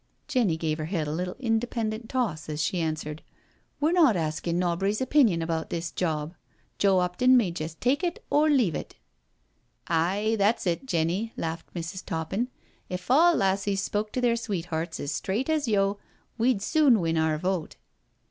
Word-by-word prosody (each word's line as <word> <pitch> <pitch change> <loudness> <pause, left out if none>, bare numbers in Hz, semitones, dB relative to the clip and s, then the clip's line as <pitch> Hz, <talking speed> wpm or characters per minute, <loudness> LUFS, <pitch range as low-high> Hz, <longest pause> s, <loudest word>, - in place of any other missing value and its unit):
Jenny 240 - +1
gave 160 -1 -2
her 155 - -2
head 160 -3 -2
a - - -2
little 180 +2 -3
independent 225 -2 -2
toss 205 - -2
as 150 -1 -4
she 175 +3 0
answered: 155 -1 -3 0.6
We're 300 +3 +2
not 320 - +5
askin' 165 +1 -1
nobry's 180 +4 0
opinion 255 - +3
about 165 -1 -2
this 170 0 -3
job. 155 -2 -2 0.5
Joe 195 -2 +4
'Opton 215 +9 +3
may 210 -8 +2
jest 160 -1 -6
take 275 +7 +1
it 345 -1 -2
or 300 +1 +4
leave 245 - +3
it,^ - - -6 0.6
" - - -44 0.2
Aye, 215 +3 0
that's 205 +3 +2
it, 175 +9 -1
Jenny,*' 180 +4 0
laughed 165 0 -4
Mrs. 175 +3 -5
Toppin. 185 +8 -2 0.2
" - - -37
If 180 +6 -6
all 335 +5 +6
lassies 195 0 +1
spoke 210 +1 -2
to 255 - -1
their 240 -1 +3
sweethearts 170 -7 -3
as 145 - -3
straight 205 - -2
as 305 -4 0
yo', 200 -1 +1 0.4
we'd 235 -3 +1
soon 290 -7 +4
win 165 -2 0
our 160 -1 +1
vote. 180 0 -2
195 Hz, 175 wpm, -27 LUFS, 165-235 Hz, 0.6 s, all